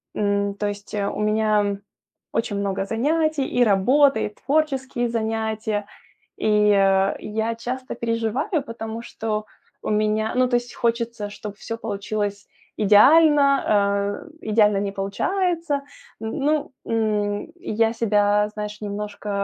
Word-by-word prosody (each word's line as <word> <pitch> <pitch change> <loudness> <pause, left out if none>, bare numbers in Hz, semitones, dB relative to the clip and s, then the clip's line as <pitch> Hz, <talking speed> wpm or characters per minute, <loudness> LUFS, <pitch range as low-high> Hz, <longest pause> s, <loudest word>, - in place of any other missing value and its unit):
м. 200 -1 0
То 205 +1 -2
есть 205 +1 -7
у 200 -1 -2
меня 210 -1 +1 0.6
очень 225 -3 -1
много 195 -1 -1
занятий, 295 +6 0
и 245 - +2
работа, 255 +7 +4
и - - -1
творческие 265 -1 -1
занятия. 220 -2 -2 0.5
И, 210 -1 +3
а 195 0 +3
я 220 +2 -2
часто 255 +3 -5
переживаю, 235 - -1
потому 225 -1 -6
что 215 -2 -4 0.4
у - - -4
меня 215 +1 +1
ну, 255 0 +3
то 245 - +2
есть 240 0 -6
хочется, 235 -2 -1
чтоб 205 0 -8
всё 230 +2 -6
получилось 205 -1 -3 0.3
идеально, 280 +7 +6
а 200 +1 +1
идеально 210 -1 +3
не 200 0 -2
получается. 330 - -1 0.4
Н 220 0 -4
ну, 295 +2 0
м, 210 +2 -1
я 225 - 0
себя, 210 -2 +2
знаешь, 210 0 -6
немножко, 205 0 -5
220 Hz, 125 wpm, -23 LUFS, 205-240 Hz, 0.6 s, идеально